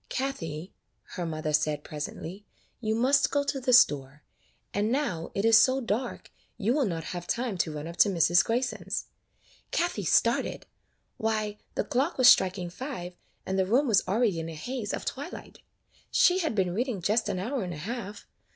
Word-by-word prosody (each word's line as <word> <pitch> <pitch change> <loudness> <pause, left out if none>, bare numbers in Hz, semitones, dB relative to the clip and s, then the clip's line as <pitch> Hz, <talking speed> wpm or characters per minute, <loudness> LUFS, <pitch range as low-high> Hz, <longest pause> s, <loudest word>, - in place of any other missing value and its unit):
"Kathie," 185 - -4 0.4
her 175 -3 -3
mother 155 -1 -3
said 150 -1 +1
presently, 160 +6 -6 0.4
''you 220 -1 0
must 260 +3 +3
go 285 0 +1
to 285 -1 -2
the 255 0 0
store; 145 - +4 0.5
and 205 +2 0
now 240 - -1
it 200 - 0
is 225 0 +7
so 260 +1 +3
dark, 235 +1 -3 0.3
you 225 +2 +1
will 280 -4 +1
not 165 -3 -3
have 175 -1 -6
time 240 -3 -1
to 160 - 0
run 150 +1 -6
up 170 +1 -8
to 205 - +6
Mrs. 175 -1 +4
Grayson's.'' 245 +2 -2 0.6
Kathie 345 +1 -1
started. - - +1 0.5
Why, 215 -1 -1 0.2
the - - 0
clock 275 +8 -1
was 255 -2 +6
strik 190 +1 -3
ing 175 -2 -5
five, 180 -6 -6 0.3
and 190 0 -1
the 190 - +2
room 260 +8 +3
was 210 -4 +4
already 205 -4 +1
in 165 0 -4
a 160 - -7
haze 225 +6 -4
of - - -4
twilight. 285 +6 -6 0.5
She 365 +1 +4
had 320 - -1
been 185 -3 +1
reading 225 -3 -2
just 210 +2 +1
an 195 - -1
hour 235 +6 -2
and 180 - -4
a 150 +3 -8
half. 215 -3 -6
210 Hz, 185 wpm, -28 LUFS, 175-250 Hz, 0.6 s, is